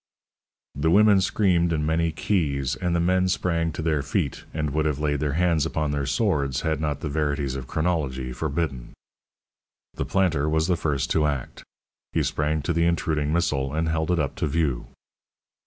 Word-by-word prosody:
The 75 +4 0
women 100 +2 +6
screamed 90 -3 +2
in 75 -2 0
many 80 +1 +1
keys, 70 - 0
and 90 -2 -1
the - - +2
men 90 +2 +2
sprang 85 -2 0
to 80 - -4
their 80 -3 +1
feet, 70 - -2
and 75 -2 -2
would 75 +2 0
have 75 -3 -1
laid 75 -1 0
their 75 -1 -1
hands 85 -1 +2
upon 80 -2 -1
their 70 -2 -1
swords 70 - 0
had 80 -2 -1
not 75 -2 -2
the - - -3
verities 70 -2 -1
of 65 -1 -6
chronology 70 -7 -1
forbidden. 70 -3 -3 1.0
The - - -3
planter 80 -6 +1
was 80 0 +2
the 90 0 +2
first 75 -3 -1
to 75 -2 +3
act; 70 -4 -4 0.5
he - - +2
sprang 75 0 -1
to 85 - 0
the 85 +1 +2
intruding 80 -3 0
missile, 75 -4 0
and 80 +1 0
held 80 0 -1
it 90 - +2
up 75 -4 -1
to - - 0
view. 70 -5 -1
80 Hz, 185 wpm, -25 LUFS, 70-85 Hz, 1.0 s, women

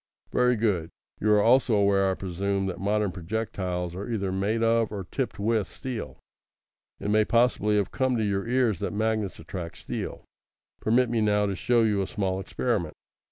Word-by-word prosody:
"Very 125 0 +3
good. 100 -8 0 0.3
You 105 - +2
are 105 - +5
also 125 -1 +4
aware, 100 -1 +3
I 95 - 0
presume, 95 +2 -2
that 95 - -4
modern 105 +1 +1
projectiles 90 -2 -3
are 100 +5 -6
either 100 -4 -1
made 105 +4 0
of 115 -1 +2
or 100 -2 -4
tipped 120 +1 -3
with 110 0 +1
steel. 125 -4 -6 0.8
It 105 - -2
may 110 0 +5
possibly 115 -2 +2
have 100 -2 +1
come 130 -2 +1
to 110 - 0
your 100 0 -1
ears 120 -6 +2
that - - -3
magnets 110 -2 -1
attract 85 0 -7
steel. - - -5 0.5
Permit 120 +2 +2
me 115 -2 +1
now 105 -1 +3
to 100 -1 -1
show 120 +4 +2
you 105 -3 +2
a 95 - -2
small 95 -4 -1
experiment." 95 -4 -2
105 Hz, 180 wpm, -27 LUFS, 95-115 Hz, 0.8 s, are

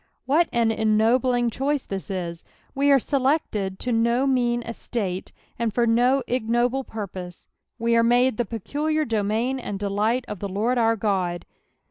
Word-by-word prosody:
What 310 +6 +3
an 230 -1 +2
en 220 -1 +1
noblio^ 240 +1 +2
choice 280 +3 -1
this 195 0 -5
ie 185 -3 -2
I - - -6 0.4
We 280 +1 +2
ere 280 - +7
selected 260 -8 0
to 250 - -2
do 235 +3 +2
mean 240 -3 +1
estate, 210 -5 -4 0.3
aotl 230 -2 0
for 240 0 +2
no 245 +4 +3
ignoble 245 +2 0
jMirposB: 185 -6 -7 0.3
we 230 0 +1
arc 230 0 +4
made 245 0 +3
the 240 - 0
peculiar 300 +9 -2
domain 225 +3 0
and 205 -5 -5
delight 210 +5 0
of 210 - -6
the 200 - -4
Lord 225 +6 0
our 225 0 +3
God. 190 -5 -1
235 Hz, 165 wpm, -24 LUFS, 210-255 Hz, 0.4 s, ere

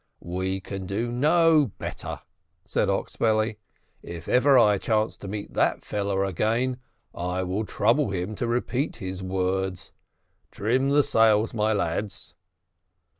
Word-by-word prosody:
"We 95 +1 -1
can 95 -1 -6
do 115 +5 -2
no 155 - +4
better," - - -6 0.4
said - - 0
Oxbelly. 110 -1 0 0.4
"If 85 -1 -8
ever 130 +2 +5
I 105 -4 +5
chance 110 +1 0
to 100 - -9
meet 105 +1 -6
that - - +1
fellow 100 -1 -1
again, 115 +7 0 0.4
I 90 +1 -2
will 95 +4 -2
trouble 120 +7 +2
him 95 +2 -3
to 120 - -1
repeat 125 +4 -1
his 95 0 -6
words. 95 0 -2 0.6
Trim 125 +6 0
the 145 +1 +4
sails, 110 -5 +3
my 110 -1 +1
lads." 100 0 -2
105 Hz, 130 wpm, -25 LUFS, 95-120 Hz, 0.6 s, ever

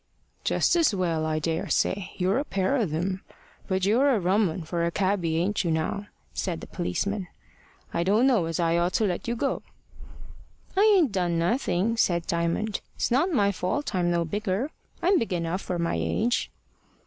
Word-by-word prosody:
"Just - - +2
as 325 -11 +3
well, 165 -4 0
I 155 0 0
daresay. 165 +4 0
You're 190 +6 +2
a - - 0
pair 195 0 0
of 220 - 0
'em. 185 +4 -2 0.5
But 190 -1 0
you 215 +5 +3
are 280 -2 +4
a - - +1
rum 190 +2 +2
'un 165 +2 -5
for 170 +2 -2
a 170 - +2
cabby 185 -3 0
ain't 190 +5 0
you 170 - -1
now?" 160 +6 -1 0.3
said 175 -4 -2
the - - -8
policeman. 195 +2 -2 0.7
"I 170 - 0
don't 205 +8 +3
know 235 -10 +3
as 165 0 -3
I 170 0 +2
ought 175 +1 +1
to - - +2
let 180 +1 -2
you 235 - 0
go." 275 +4 -1 1.1
"I 385 - +3 0.2
ain't 315 - +3
done 175 -3 0
nothing," 220 +3 +1
said 170 -6 +2
Diamond. 170 +5 -1
"It's - - -1
not 285 +10 +3
my 205 -9 +3
fault 200 +10 -2
I'm 180 -2 +1
no 170 -1 +1
bigger. 205 - -2 0.3
I'm 370 +1 +4
big 220 -4 -2
enough 170 +2 -1
for 180 - -3
my 170 - 0
age." 215 - 0
185 Hz, 190 wpm, -26 LUFS, 170-215 Hz, 1.1 s, are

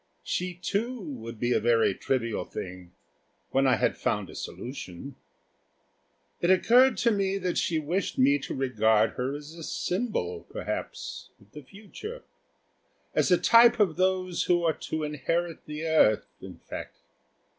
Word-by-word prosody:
She, 180 0 -2
too, 225 +8 -2
would 120 - -7
be 120 +1 +1
a - - +3
very 115 -2 +3
trivial 115 0 -1
thing 90 -1 -8 0.6
when 135 0 +3
I 130 - +5
had - - +1
found - - -1
a - - -12
solution. 125 0 -7 1.2
It 175 - +1
occurred 245 +8 +5
to 235 - +3
me 195 -2 0
that 180 -2 -2
she 165 - 0
wished 165 +5 -2
me 140 +2 +4
to - - -5
regard 110 -4 +2
her 130 +3 -3
as 150 +2 -9
a 165 - -10
symbol, 175 - -2
perhaps, - - -5
of 100 0 -23
the 150 - -9
future 215 - -10 0.9
as - - +2
a 180 - +6
type 235 +3 +6
of 190 -7 +3
those 185 -1 0
who 175 -1 +2
are 165 -1 +3 0.2
to 160 -1 -2
inherit 160 +4 -2
the 150 +2 -5
earth, 155 -10 +4 0.2
in - - -10
fact. - - -8
160 Hz, 155 wpm, -27 LUFS, 125-185 Hz, 1.2 s, a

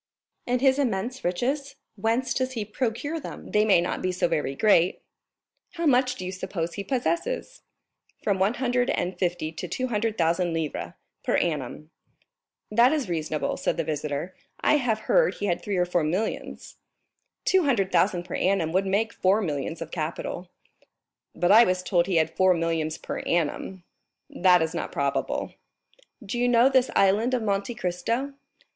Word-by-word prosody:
"And 245 0 +1
his 265 0 +4
immense 245 0 -1
riches, 270 +11 -1 0.2
whence 225 +5 0
does 260 0 -1
he 220 -4 -3
procure 255 +8 -2
them?" - - -9
"They 210 0 +4
may 205 -5 +5
not 175 - -2
be 185 - 0
so 180 - 0
very 150 -5 -1
great." 185 -1 +3 0.7
"How 340 -1 -3
much 255 -3 +3
do 185 - -6
you 185 - -3
suppose 185 -3 -4
he 200 - -4
possesses?" 340 - -2 0.6
"From 200 -3 +1
one 200 +5 +2
hundred 245 -1 0
and 180 +1 -1
fifty 175 -4 -1
to 160 - -6
two 255 0 -3
hundred 225 0 -1
thousand 170 +1 +1
livres 160 -2 -3 0.3
per - - +1
annum." 150 -1 -2 0.8
"That 235 +4 +5
is 295 -10 -1
reasonable," 155 -2 -2
said - - -1
the - - 0
visitor; 150 +2 -3 0.3
"I 300 - +3
have 230 -6 0
heard 485 - +3
he 205 - -4
had 175 -4 0
three 200 -2 -2
or 180 - +3
four 175 -2 0
millions." 185 +8 -3 0.7
"Two 375 -3 +3
hundred 205 -9 +1
thousand 180 0 +2
per - - -9
annum 185 -4 +1
would 190 +3 +1
make 215 +4 0
four 190 +3 +2
millions 160 -3 -3
of 165 - -13
capital." 170 +2 -4 0.9
"But 175 +1 +2
I 225 +3 +9
was 185 -3 0
told 175 -1 +2
he 190 - 0
had 160 0 +1
four 185 -1 +4
millions 165 -1 -1
per - - -5
annum." 175 +3 -2 0.5
"That 180 -2 +4
is 160 +1 -3
not - - -4
probable." 140 -1 -2 0.7
"Do 225 +5 -3
you 245 - +2
know 245 +1 +5
this 260 -1 +3
Island 210 +6 +3
of 240 - -2
Monte 200 +3 -1
Cristo?" 230 +10 -2
195 Hz, 175 wpm, -26 LUFS, 170-245 Hz, 0.9 s, I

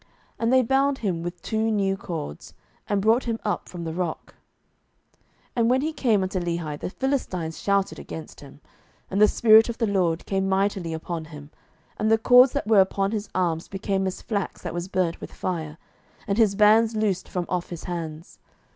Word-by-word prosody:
And 230 +1 +1
they 260 0 +5
bound 270 +3 +2
him 185 -8 -2
with 175 +1 -5
two 220 0 0
new 195 -3 +1
cords, 165 - -7 0.3
and 200 -1 +1
brought 225 +4 +3
him 230 -2 -1
up 210 - -2
from 175 -2 -7
the 160 -1 -4
rock. 175 -2 -4 0.8
07:015:014 - - -38 0.4
And 230 -1 +3
when 260 +1 +3
he 315 +2 -2
came 220 -9 +2
unto 185 0 -2
Lehi, 170 -4 -3
the - - -4
Philistines 185 - -2
shouted 200 -1 0
against 160 - -9
him: 140 +1 -14 0.5
and 195 +2 +1
the 210 - +8
Spirit 220 +1 +6
of 235 - -4
the 230 - +1
LORD 180 -5 0
came 195 0 -1
mightily 190 -3 0
upon 160 0 -5
him, 150 -2 -11 0.5
and 215 - +1
the 225 - +6
cords 250 +3 +6
that 280 - -2
were 215 -2 +6
upon 195 +1 0
his 215 -1 -3
arms 170 -3 0
became 195 -1 -2
as 185 - -5
flax 200 -4 -3
that 175 - -4
was 175 +1 -4
burnt 185 -3 -1
with - - -8
fire, 160 -4 -4 0.5
and 200 +2 0
his 210 -3 +4
bands 220 +2 +5
loosed 205 -4 -1
from 180 -1 -2
off 180 -1 -2
his 170 -2 -7
hands. 165 -2 -6
195 Hz, 195 wpm, -25 LUFS, 170-220 Hz, 0.8 s, the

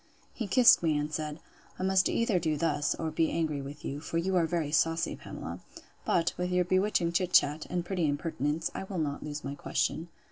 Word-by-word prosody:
He 225 - -4
kissed 240 +5 +6
me, 160 -3 +2
and 150 +1 -3
said, 155 0 -3 0.4
I - - -4
must 190 -1 +3
either 225 -5 +1
do 155 -2 0
thus, 145 -2 0
or 160 -1 -3
be 160 +1 +1
angry 155 -4 -1
with 140 +2 -9
you; 140 - -4
for 165 - -3
you 185 +3 0
are 170 -2 +3
very 160 -4 -1
saucy, 165 +1 +1
Pamela.—But, 165 -1 -4
with 180 0 -1
your 180 0 +2
bewitching 185 -1 +1
chit 180 +1 0
chat, 150 +2 +4
and 175 -1 -2
pretty 175 -3 0
impertinence, 150 +1 -1
I - - -5
will 190 -1 -6
not 145 -3 -2
lose 150 0 -6
my 140 - -4
question. 160 +3 -2
165 Hz, 205 wpm, -30 LUFS, 150-180 Hz, 0.4 s, kissed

